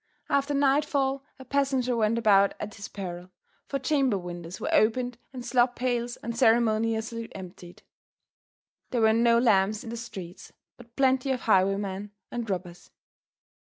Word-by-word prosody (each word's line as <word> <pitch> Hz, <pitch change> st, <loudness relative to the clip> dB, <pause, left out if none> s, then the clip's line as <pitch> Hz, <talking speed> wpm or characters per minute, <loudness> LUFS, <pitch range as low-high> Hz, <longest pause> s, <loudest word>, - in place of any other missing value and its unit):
After 280 Hz, +1 st, +1 dB
nightfall 275 Hz, -1 st, +1 dB
a 265 Hz, -, -12 dB
passenger 265 Hz, -2 st, 0 dB
went 225 Hz, 0 st, +1 dB
about 200 Hz, -3 st, +4 dB
at 210 Hz, 0 st, -5 dB
his 200 Hz, -, -8 dB
peril, 180 Hz, -2 st, -7 dB, 0.4 s
for 275 Hz, -, -2 dB
chamber 270 Hz, -4 st, +1 dB
windows 175 Hz, 0 st, -7 dB
were -, -, -2 dB
opened 245 Hz, +2 st, +2 dB
and 250 Hz, -2 st, -8 dB
slop 245 Hz, 0 st, +2 dB
pails 245 Hz, -1 st, -1 dB
unceremoniously 225 Hz, 0 st, +1 dB
emptied. 180 Hz, -1 st, -11 dB, 1.1 s
There 240 Hz, -, 0 dB
were 220 Hz, 0 st, +5 dB
no 235 Hz, +1 st, +4 dB
lamps 215 Hz, -2 st, +3 dB
in 230 Hz, -, -7 dB
the 235 Hz, -, -5 dB
streets, 190 Hz, -7 st, -9 dB, 0.2 s
but 235 Hz, -1 st, -17 dB
plenty 265 Hz, 0 st, +2 dB
of 255 Hz, -2 st, 0 dB
highwaymen 195 Hz, 0 st, +1 dB, 0.2 s
and 235 Hz, -2 st, -4 dB
robbers. 180 Hz, -2 st, -5 dB
230 Hz, 140 wpm, -27 LUFS, 200-255 Hz, 1.1 s, were